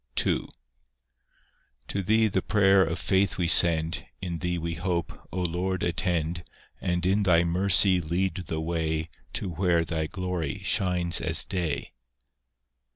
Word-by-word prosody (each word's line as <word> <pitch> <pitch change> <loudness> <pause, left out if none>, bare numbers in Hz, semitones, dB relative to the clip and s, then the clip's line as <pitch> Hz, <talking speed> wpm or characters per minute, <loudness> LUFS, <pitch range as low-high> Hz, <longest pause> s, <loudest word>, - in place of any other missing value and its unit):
II - - 0 1.4
To 100 - -2
Thee 110 +4 +3
the 95 -2 0
prayer 95 -2 +4
of 85 0 -2
faith 95 +1 +1
we 90 -2 0
send, 80 -1 +3 0.2
In 85 -3 -5
Thee 90 0 -2
we 85 0 -3
hope: 85 0 -4
O 95 - -3
Lord, 90 +2 -2
attend, 85 -1 -1 0.4
And 90 0 -1
in 100 +3 +2
Thy 85 -3 +4
mercy 90 +1 +3
lead 90 +2 -2
the 80 -1 -3
way 80 -1 -2 0.2
To 100 - -3
where 85 -1 +1
Thy 80 -1 -2
glory 90 -2 -4
shines 90 -4 +2
as - - +4
day. 85 -6 -3
90 Hz, 140 wpm, -26 LUFS, 85-95 Hz, 1.4 s, prayer